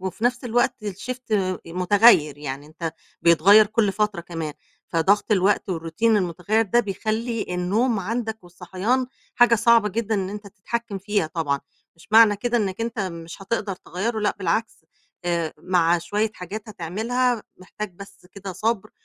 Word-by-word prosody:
وفي 190 Hz, +5 st, -4 dB
نَفْس 250 Hz, +1 st, +1 dB
الوقت 240 Hz, +2 st, +2 dB
الshift 225 Hz, +4 st, -4 dB, 0.3 s
مُتغيّر، 180 Hz, -, +4 dB
يعني 140 Hz, 0 st, -6 dB
أنت 160 Hz, +1 st, -5 dB, 0.3 s
بيتغيّر 190 Hz, +6 st, +6 dB
كل 215 Hz, -2 st, +1 dB
فترة 210 Hz, -3 st, -1 dB
كمان، 165 Hz, -3 st, -5 dB, 0.4 s
فضَغْط 200 Hz, +6 st, +2 dB
الوقت 195 Hz, 0 st, +2 dB
والroutine 165 Hz, +3 st, -6 dB
المتغيّر 205 Hz, 0 st, +2 dB
ده 235 Hz, +3 st, +2 dB
بيخلّي 220 Hz, +2 st, -2 dB
النوم 205 Hz, +6 st, +1 dB
عندك 220 Hz, +1 st, -3 dB
والصحيان 185 Hz, +8 st, -2 dB, 0.3 s
حاجة 240 Hz, -1 st, +5 dB
صعبة 230 Hz, -1 st, +4 dB
جدًا 220 Hz, +2 st, -2 dB
إن 190 Hz, -1 st, -1 dB
أنت 205 Hz, 0 st, -8 dB
تتحكِّم 210 Hz, +1 st, -5 dB
فيها 205 Hz, -3 st, 0 dB
طبعًا. 150 Hz, -4 st, -2 dB, 0.4 s
مش 165 Hz, -, -19 dB
معنى 220 Hz, -2 st, +7 dB
كده 240 Hz, +3 st, -1 dB
إنّك 200 Hz, -1 st, -1 dB
أنت 230 Hz, 0 st, -3 dB
مش 170 Hz, -1 st, -5 dB
هتقدر 200 Hz, -1 st, -2 dB
تغيّره 220 Hz, +7 st, -3 dB
لأ 210 Hz, -, +1 dB
بالعكس، 195 Hz, 0 st, -2 dB, 0.4 s
آآ 170 Hz, -2 st, -1 dB
مع 175 Hz, -2 st, +2 dB
شوية 205 Hz, +6 st, -1 dB
حاجات 195 Hz, +4 st, -7 dB
هتعملها، 225 Hz, +7 st, -1 dB
محتاج 190 Hz, +2 st, -7 dB
بس 200 Hz, 0 st, -13 dB
كده 200 Hz, -1 st, -7 dB
صَبْر 215 Hz, +2 st, -1 dB
200 Hz, 150 wpm, -23 LUFS, 175-225 Hz, 0.4 s, معنى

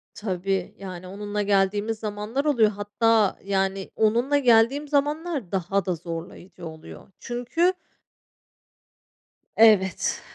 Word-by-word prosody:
Tabii, 190 Hz, -2 st, -3 dB
yani, 185 Hz, -2 st, -8 dB
onunla 205 Hz, +2 st, -4 dB
geldiğimiz 205 Hz, +2 st, +1 dB
zamanlar 215 Hz, +6 st, -3 dB
oluyor. 240 Hz, -8 st, +4 dB
Hatta 210 Hz, +1 st, +1 dB
yani 195 Hz, 0 st, -1 dB
onunla 235 Hz, +6 st, +2 dB
geldiğim 250 Hz, +3 st, +3 dB
zamanlar 290 Hz, -, -1 dB
daha 195 Hz, 0 st, -1 dB
da 180 Hz, -, -1 dB
zorlayıcı 170 Hz, +2 st, -8 dB
oluyor 160 Hz, 0 st, -11 dB
çünkü 250 Hz, +10 st, 0 dB, 1.8 s
Evet 205 Hz, -5 st, +4 dB
205 Hz, 100 wpm, -24 LUFS, 190-240 Hz, 1.8 s, oluyor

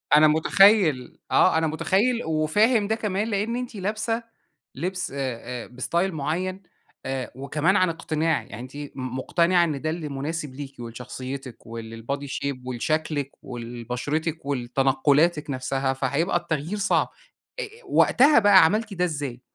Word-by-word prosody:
أنا 155 Hz, +1 st, +7 dB
متخيل، 160 Hz, -, +4 dB
آه، -, -, +5 dB
أنا 160 Hz, 0 st, +2 dB
متخيل 205 Hz, +10 st, +1 dB
وفاهم 200 Hz, +8 st, +2 dB
ده 220 Hz, -, +1 dB
كمان 210 Hz, -1 st, -1 dB
لأن 220 Hz, +2 st, -1 dB
أنتِ 250 Hz, -2 st, -5 dB
لابسة 215 Hz, +4 st, -2 dB, 0.5 s
لبس 185 Hz, +4 st, -3 dB
آآ 140 Hz, -, -7 dB, 0.5 s
آآ -, -, -12 dB
بإستايل 170 Hz, +9 st, -1 dB
معين، 180 Hz, +6 st, -2 dB, 0.4 s
آآ 130 Hz, -1 st, -3 dB
وكمان 150 Hz, +7 st, 0 dB
عن 185 Hz, -3 st, +4 dB
اقتناع، 160 Hz, -1 st, 0 dB
يعني 110 Hz, -, -10 dB
أنتِ 130 Hz, +2 st, -10 dB
م 145 Hz, -1 st, -5 dB, 0.3 s
مقتنعة 170 Hz, +5 st, +3 dB
إن 150 Hz, -5 st, -2 dB
ده 155 Hz, -, -1 dB
اللي 160 Hz, -2 st, -4 dB
مناسب 145 Hz, 0 st, -4 dB
ليكِ، 140 Hz, -1 st, -8 dB
ولشخصيتِك، 125 Hz, +2 st, -7 dB
ولل 115 Hz, 0 st, -8 dB
body 140 Hz, 0 st, -3 dB
shape 140 Hz, 0 st, -3 dB
ولشكلِك، 145 Hz, +3 st, -1 dB
ولبشرتِك، 125 Hz, +7 st, -4 dB
ولتنقلاتِك 140 Hz, +4 st, +2 dB
نفسها، 135 Hz, 0 st, -1 dB
فهيبقى 140 Hz, +7 st, 0 dB
التغيير 170 Hz, +3 st, -3 dB
صعب. 200 Hz, -, +2 dB, 0.5 s
أ -, -, -1 dB
أ -, -, -3 dB, 0.2 s
وقتها 275 Hz, 0 st, +5 dB
بقى، 200 Hz, -5 st, +7 dB
عملتِ 215 Hz, +4 st, 0 dB
ده 180 Hz, -1 st, +1 dB
إزاي؟ 145 Hz, -7 st, -4 dB
155 Hz, 145 wpm, -25 LUFS, 135-185 Hz, 0.5 s, أنا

